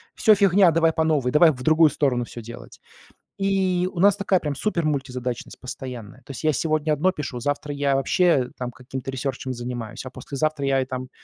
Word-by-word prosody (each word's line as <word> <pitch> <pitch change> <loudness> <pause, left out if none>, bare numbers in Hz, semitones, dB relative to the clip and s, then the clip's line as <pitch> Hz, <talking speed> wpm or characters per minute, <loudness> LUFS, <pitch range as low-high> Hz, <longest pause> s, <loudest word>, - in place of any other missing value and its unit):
всё, 215 -2 +5
фигня, 195 -2 +5
давай 165 0 +2
по 160 - +1
новой, 145 -6 +1
давай 160 +2 +6
в 125 -2 -8
другую 155 +1 +5
сторону 125 -5 0
всё 120 - -9
делать". 120 +1 -11 0.6
И 190 -2 +1
у 175 - -7
нас 200 +1 +6
такая 200 -2 +1
прям 145 -2 -3
супермультизадачность 135 - -3
постоянная. 125 -2 -8
То - - -19
есть 135 - -8
я 155 - +3
сегодня 155 +1 0
одно 165 +5 +2
пишу, 145 -7 -5
завтра 145 +2 -2
я 140 -1 +1
вообще 135 -2 +2
там 125 -1 -4
каким-то 130 +2 -7
ресерчем 130 0 -4
занимаюсь, 120 -1 -6
а - - -6
послезавтра 145 +2 -3
я 135 -1 +2
и - - -4
там, 130 0 -5
145 Hz, 190 wpm, -23 LUFS, 130-165 Hz, 0.6 s, давай